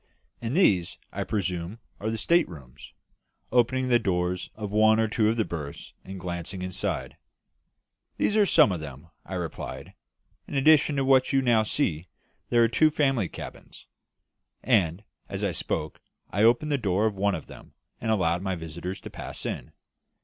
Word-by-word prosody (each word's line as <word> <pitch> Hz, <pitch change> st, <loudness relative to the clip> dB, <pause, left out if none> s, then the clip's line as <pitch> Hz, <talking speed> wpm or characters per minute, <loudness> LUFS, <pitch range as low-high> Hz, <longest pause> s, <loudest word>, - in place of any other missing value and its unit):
"And 120 Hz, +6 st, -2 dB
these, 95 Hz, -, +3 dB
I -, -, -3 dB
presume, 90 Hz, -1 st, -3 dB, 0.2 s
are 110 Hz, -, -2 dB
the 110 Hz, -, -2 dB
state 170 Hz, +8 st, +3 dB
rooms," 70 Hz, -5 st, -12 dB, 0.6 s
opening 130 Hz, +2 st, +2 dB
the 120 Hz, -1 st, +4 dB
doors 90 Hz, -3 st, -1 dB
of 105 Hz, -2 st, -5 dB
one 110 Hz, +1 st, +5 dB
or 110 Hz, -, +3 dB
two 110 Hz, 0 st, +2 dB
of 115 Hz, -, 0 dB
the 110 Hz, -, +1 dB
berths 75 Hz, -4 st, -7 dB
and 95 Hz, 0 st, -8 dB
glancing 90 Hz, +1 st, -5 dB
inside. 90 Hz, -1 st, -3 dB, 1.0 s
"These 210 Hz, -, +1 dB
are 210 Hz, -2 st, +5 dB
some 155 Hz, -, +6 dB
of 90 Hz, -, -2 dB
them," 75 Hz, +2 st, -10 dB
I 95 Hz, -, -6 dB
replied. 85 Hz, -3 st, -6 dB, 0.5 s
"In -, -, -6 dB
addition 150 Hz, +1 st, +5 dB
to 135 Hz, -1 st, +1 dB
what 130 Hz, -1 st, +4 dB
you 135 Hz, 0 st, +3 dB
now 120 Hz, -3 st, +4 dB
see, 95 Hz, -, -1 dB, 0.4 s
there 120 Hz, -1 st, +5 dB
are -, -, +5 dB
two 155 Hz, +7 st, +4 dB
family 135 Hz, -, +1 dB
cabins." -, -, -10 dB, 0.8 s
And, 100 Hz, -6 st, +2 dB, 0.3 s
as -, -, -4 dB
I -, -, +1 dB
spoke, -, -, -3 dB, 0.3 s
I 100 Hz, -, 0 dB
opened 120 Hz, +7 st, +4 dB
the 140 Hz, -, +1 dB
door 100 Hz, -1 st, +1 dB
of 110 Hz, -, +1 dB
one 100 Hz, 0 st, +1 dB
of 80 Hz, -, -7 dB
them, -, -, -14 dB, 0.2 s
and 115 Hz, -, -3 dB
allowed 90 Hz, -5 st, +2 dB
my 95 Hz, -1 st, -1 dB
visitors 85 Hz, +3 st, -6 dB
to -, -, -9 dB
pass -, -, -7 dB
in. -, -, -4 dB
105 Hz, 175 wpm, -27 LUFS, 90-120 Hz, 1.0 s, some